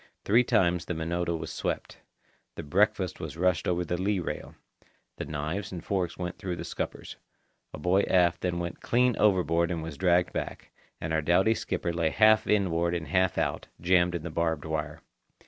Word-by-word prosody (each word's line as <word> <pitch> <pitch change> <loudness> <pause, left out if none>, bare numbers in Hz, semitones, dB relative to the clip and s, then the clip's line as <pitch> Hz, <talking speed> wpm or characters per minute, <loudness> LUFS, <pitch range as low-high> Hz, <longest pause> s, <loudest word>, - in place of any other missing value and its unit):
Three 115 +5 +5
times 90 -8 +2
the 90 - -3
Minota 85 +1 -1
was - - -6
swept. - - -4 0.6
The 85 - -6
breakfast 70 - +1
was - - -6
rushed 90 -3 +1
over 90 0 0
the 90 +2 -2
lee 100 +1 +1
rail. 85 - -5 0.6
The - - -4
knives 80 +6 -4
and 85 -3 -7
forks 90 -3 -1
went 90 0 -5
through 90 -2 -3
the - - -6
scuppers; - - -5 0.5
a - - -7
boy 90 +6 +2
aft 90 -2 +3
went 85 -1 -3
clean 125 0 +2
overboard 85 -5 +3
and 85 -3 -3
was 80 -3 -7
dragged 90 -1 +3
back; - - -5 0.3
and 80 - -3
our 80 - +2
doughty 90 +8 +3
skipper 90 -5 -3
lay 85 -1 +1
half 110 +4 +4
inboard 85 -4 +1
and 85 -2 -4
half 95 -1 +2
out, - - -1
jammed 90 0 +3
in 85 - -4
the 85 - -5
barbed 80 -2 -1
wire. 75 -1 -4
85 Hz, 180 wpm, -28 LUFS, 85-95 Hz, 0.6 s, Three